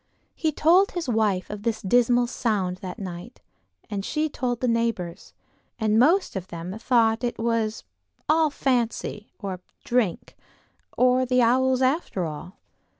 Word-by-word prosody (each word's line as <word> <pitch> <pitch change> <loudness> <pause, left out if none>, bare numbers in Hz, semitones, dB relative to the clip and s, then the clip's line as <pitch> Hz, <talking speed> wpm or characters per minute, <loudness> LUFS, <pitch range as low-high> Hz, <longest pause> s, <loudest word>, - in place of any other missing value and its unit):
He 320 -2 -1
told 350 +7 +4
his 350 -4 -3
wife 215 -6 +1
of 210 -1 -6
this 225 0 -1
dismal 245 +4 +3
sound 210 -7 -1
that 185 -1 -7
night, 175 -3 -8 0.5
and 200 -1 -4
she 310 +7 -1
told 245 -4 -2
the 255 - 0
neighbors, 230 -7 -2 0.4
and 220 -1 +2
most 335 - +3
of 190 -1 -4
them 175 +2 -6
thought 225 -2 +3
that 245 - -1
it 240 - -5
was 225 -1 -1 0.4
"all 315 0 +3
fancy"—or 225 -7 -2 0.2
drink, 235 -7 -1 0.6
or 255 +1 +4
the 250 -1 +2
owls 260 +2 +3
after 255 - 0
all. 160 +4 -8
230 Hz, 145 wpm, -25 LUFS, 200-255 Hz, 0.6 s, told